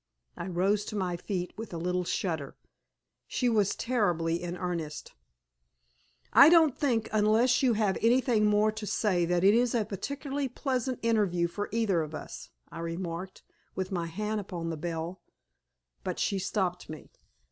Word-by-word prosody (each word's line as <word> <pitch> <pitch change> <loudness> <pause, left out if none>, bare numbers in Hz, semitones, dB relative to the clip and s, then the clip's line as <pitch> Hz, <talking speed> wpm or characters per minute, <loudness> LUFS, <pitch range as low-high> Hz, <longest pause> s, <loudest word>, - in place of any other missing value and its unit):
I 170 - -5
rose 190 +3 +1
to 215 - -6
my 185 -3 -1
feet 180 0 -4
with 225 -6 -6
a - - -3
little 180 +2 -1
shudder. 160 -7 -2 0.7
She 250 - 0
was 210 -4 +2
terribly 175 -9 0
in 175 0 -4
earnest. 170 -4 -4 1.2
"I 285 - +9
don't 320 -5 +5
think, 235 -6 0
unless 220 +4 +3
you 255 -3 +4
have 210 -3 +1
anything 230 -2 +3
more 210 +1 +3
to 215 -1 -6
say, 185 -6 +1
that 175 +1 +1
it 200 +2 +6
is 240 +1 +2
a 220 -3 +1
particularly 275 +7 -4
pleasant 255 0 -2
interview 200 -7 +2
for 205 +4 -5
either 210 -6 +1
of 155 0 -5
us," - - -8 0.2
I - - -8
remarked, 170 +2 -5 0.3
with 185 +1 -3
my 170 -3 -2
hand 210 +5 -2
upon 170 -4 -5
the - - -3
bell. 165 +3 -4 0.8
But - - -3
she 195 - 0
stopped 180 -3 -2
me. 155 -1 -9
195 Hz, 160 wpm, -29 LUFS, 175-225 Hz, 1.2 s, I